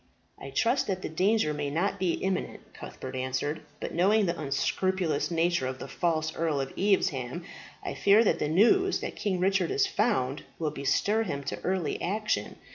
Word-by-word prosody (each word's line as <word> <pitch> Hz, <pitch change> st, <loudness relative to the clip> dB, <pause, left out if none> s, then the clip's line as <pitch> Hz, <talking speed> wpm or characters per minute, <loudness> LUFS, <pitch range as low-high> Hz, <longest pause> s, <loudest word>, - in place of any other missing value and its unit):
"I 140 Hz, -, -8 dB
trust 235 Hz, -, +1 dB
that 185 Hz, -2 st, -2 dB
the -, -, -3 dB
danger 185 Hz, 0 st, +2 dB
may 145 Hz, -1 st, -2 dB
not 170 Hz, +7 st, -1 dB
be 180 Hz, -3 st, +1 dB
imminent," 190 Hz, -1 st, -3 dB
Cuthbert 130 Hz, 0 st, -8 dB
answered. 130 Hz, +4 st, -2 dB, 0.2 s
"But -, -, -5 dB
knowing 200 Hz, +5 st, +3 dB
the 170 Hz, -1 st, 0 dB
unscrupulous 155 Hz, +1 st, 0 dB
nature 170 Hz, -4 st, +1 dB
of 130 Hz, 0 st, -4 dB
the -, -, -7 dB
false 160 Hz, -2 st, -1 dB
Earl 160 Hz, -3 st, 0 dB
of 135 Hz, 0 st, -3 dB
Evesham, 170 Hz, -7 st, 0 dB, 0.4 s
I -, -, -3 dB
fear 205 Hz, +3 st, +5 dB
that 210 Hz, -, +2 dB
the -, -, 0 dB
news 305 Hz, -, +4 dB
that -, -, -4 dB
King 190 Hz, -3 st, -1 dB
Richard 195 Hz, -, +2 dB
is 405 Hz, 0 st, +2 dB
found 210 Hz, -, 0 dB, 0.2 s
will 155 Hz, -2 st, -1 dB
bestir 150 Hz, +10 st, +1 dB
him 140 Hz, -10 st, -3 dB
to 140 Hz, -, -5 dB
early 185 Hz, -3 st, -1 dB
action. 210 Hz, +4 st, -1 dB
175 Hz, 180 wpm, -28 LUFS, 145-200 Hz, 0.4 s, fear